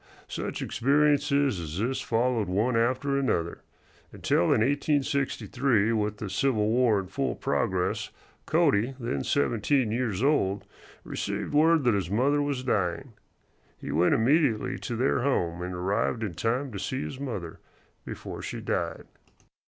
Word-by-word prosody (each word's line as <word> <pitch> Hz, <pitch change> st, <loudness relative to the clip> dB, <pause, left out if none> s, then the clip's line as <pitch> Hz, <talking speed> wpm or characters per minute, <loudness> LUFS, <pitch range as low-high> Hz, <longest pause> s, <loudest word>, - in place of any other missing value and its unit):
Such -, -, -4 dB
experiences 140 Hz, -1 st, +2 dB
as 80 Hz, -1 st, -5 dB
this 125 Hz, +6 st, -1 dB
followed 115 Hz, -2 st, 0 dB
one 105 Hz, +7 st, +1 dB
after 130 Hz, +4 st, +1 dB
another, 85 Hz, -11 st, -1 dB, 0.5 s
until 85 Hz, -, +1 dB
in 110 Hz, -, +3 dB
1863, 135 Hz, -4 st, +1 dB
with 105 Hz, -1 st, -1 dB
the 105 Hz, -, -5 dB
Civil 110 Hz, 0 st, +1 dB
War 115 Hz, -3 st, +3 dB
in 95 Hz, -, -4 dB
full 135 Hz, +9 st, -2 dB
progress, 95 Hz, -9 st, -1 dB, 0.4 s
Cody, 115 Hz, +6 st, +2 dB
then 120 Hz, +1 st, -2 dB
seventeen 130 Hz, -2 st, +1 dB
years 115 Hz, -3 st, -1 dB
old, 105 Hz, -9 st, +1 dB, 0.4 s
received -, -, -4 dB
word 160 Hz, +1 st, +4 dB
that 120 Hz, -2 st, +3 dB
his 95 Hz, -4 st, -1 dB
mother 135 Hz, +8 st, +2 dB
was 140 Hz, -3 st, -2 dB
dying. 110 Hz, +1 st, -1 dB, 0.6 s
He -, -, -6 dB
went 85 Hz, +5 st, +3 dB
immediately 130 Hz, 0 st, +2 dB
to 120 Hz, -, -4 dB
their 125 Hz, +3 st, +1 dB
home, 90 Hz, -10 st, 0 dB
and 90 Hz, 0 st, -4 dB
arrived 100 Hz, +6 st, -1 dB
in 100 Hz, -5 st, -3 dB
time 125 Hz, -, -1 dB
to 100 Hz, -, -6 dB
see 130 Hz, +7 st, -3 dB
his 135 Hz, -, -6 dB
mother 105 Hz, -12 st, -5 dB, 0.4 s
before -, -, -7 dB
she -, -, -5 dB
died. -, -, -3 dB
120 Hz, 145 wpm, -27 LUFS, 100-140 Hz, 0.6 s, word